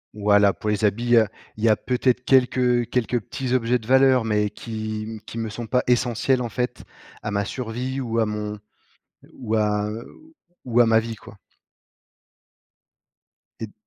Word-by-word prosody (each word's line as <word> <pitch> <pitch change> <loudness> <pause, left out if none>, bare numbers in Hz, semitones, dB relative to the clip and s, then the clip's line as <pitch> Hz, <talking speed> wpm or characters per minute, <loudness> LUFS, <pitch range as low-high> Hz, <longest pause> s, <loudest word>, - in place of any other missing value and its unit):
Voilà, 105 -1 +4
pour 105 - -4
les 105 0 +1
habits, 120 +4 +2
heu, 110 -1 +6 0.3
il 110 - -7
y 115 - +5
a 105 - +5
peut-être 125 +1 0
quelques 125 -2 +3
quelques 125 0 0
petits 125 +4 -5
objets 125 0 +1
de 110 - -14
valeur, 130 -2 +4
mais 105 -1 0
qui 110 0 -5
qui 115 - -7
me 110 -1 -3
sont 115 +2 -6
pas 125 +3 +1
essentiels 125 +1 +1
en 120 - -4
fait 125 +2 -3 0.4
à 105 - -3
ma 100 0 0
survie 125 +3 -4
ou 115 -3 -2
à 110 - +2
mon 105 0 -4 0.8
ou 110 -4 -4
à 105 -1 +1 0.8
ou 120 -1 +1
à 120 - +7
ma 110 0 +4
vie 115 0 -5
quoi. 100 0 -15 2.2
Tu 110 - -3
es - - -14
d - - -25
115 Hz, 175 wpm, -23 LUFS, 105-125 Hz, 2.2 s, à